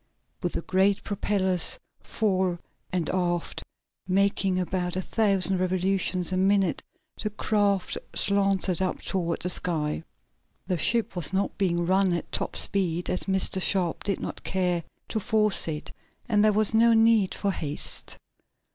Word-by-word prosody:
With - - -2
the - - -3
great 190 +1 +1
propellers, 190 -3 +1 0.2
fore 185 -5 -1 0.3
and 175 -3 -1
aft, 175 -2 -2 0.5
making 195 0 +2
about 180 -1 -2
a 185 - -1
thousand 195 -3 +1
revolutions 185 0 0
a 185 - 0
minute 195 -1 +2 0.4
the 215 - -2
craft 205 -2 0 0.2
slanted 195 -3 +1
up 185 - -1
toward 170 -3 -2
the 180 - -1
sky. 160 -4 0 0.6
The 180 -2 -2
ship 230 +7 +1
was 175 +1 +1
not 195 +1 -1
being 175 -3 +1
run 190 0 +2
at 170 - -4
top - - -3
speed 180 -3 +1
as 180 - -1
Mr. 190 -1 +1
Sharp 180 -3 +1
did 200 -1 -1
not - - -6
care 180 -2 -1 0.3
to 220 - -1
force 215 -2 +3
it, 150 -2 -5 0.4
and 210 -3 +2
there 215 - +5
was 215 +1 +2
no 230 +1 +5
need 225 -3 +3
for 200 - -1
haste. 150 -5 -2
190 Hz, 145 wpm, -26 LUFS, 180-200 Hz, 0.6 s, there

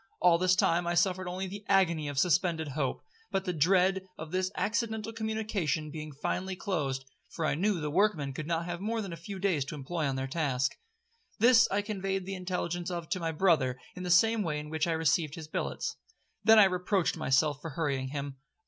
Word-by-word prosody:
All 175 -2 +5
this 185 0 +4
time 175 -1 +2
I 175 - 0
suffered 185 +1 +2
not 180 - -4
only 190 +1 -3
the 200 +2 -7
agony 170 -6 +3
of 145 -1 -5
suspended 165 0 +2
hope, 135 -1 -2 0.3
but 195 0 -1
the 180 - -1
dread 185 +4 +3 0.2
of 160 0 -8
this 185 0 0
accidental 220 0 -1
communication 215 -9 -2
being 155 -1 -6
finally 185 +6 -3
closed; 145 -9 -2 0.2
for 165 - -3
I - - +2
knew 190 +4 +1
the 150 -1 -3
workmen 165 -6 +1
could 150 +3 -5
not 170 0 -1
have 175 0 -5
more 225 +3 -1
than 190 -4 -6
a - - -4
few 180 +5 -7
days 185 -7 +1
to 135 - -6
employ 150 +2 -2
on 135 - -1
their 130 0 -2
task. 135 -3 0 0.6
This 235 +1 +6
I 205 +1 0
conveyed 195 -2 -2
the 195 - -4
intelligence 180 -1 -3
of 170 -3 -5
to 185 - -1
my 165 -1 -1
brother 150 -7 +2 0.2
in 180 - -7
the 180 - -4
same 220 +6 +5
way 160 -6 -1
in 150 0 -6
which 160 +1 0
I 165 - +1
received 160 -1 +1
his 160 -2 -8
billets. - - -3 0.5
Then 225 0 +7
I 215 - +10
reproached 185 0 +1
myself 145 +2 +1
for 165 - -5
hurrying 140 -3 -1
him. 140 0 -5
175 Hz, 210 wpm, -30 LUFS, 150-195 Hz, 0.6 s, I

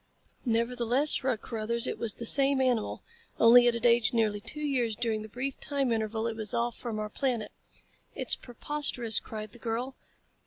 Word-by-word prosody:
"Nevertheless," 240 +4 +2
shrugged 255 -4 0
Carruthers. 230 +1 -2
"It - - -3
was 225 -2 -1
the 235 - -7
same 275 +2 +4
animal 250 -4 0 0.4
only 240 +1 +7
it 240 - +3
had 235 +1 -4
aged 235 +1 +3
nearly 215 -3 +1
two 265 +7 -6
years 250 -7 0
during 220 -1 -1
the 215 - -9
brief 260 +4 -5
time 275 -3 -1
interval 220 0 -2
it 230 -1 -2
was 220 -2 -4
off 235 0 -1
from 230 -3 -5
our 215 0 -3
planet." 235 -2 -2 0.6
"It's - - +3
preposterous," 250 -2 0
cried 215 -1 -8
the 240 - -11
girl. 240 +3 -4
235 Hz, 180 wpm, -29 LUFS, 220-255 Hz, 0.6 s, only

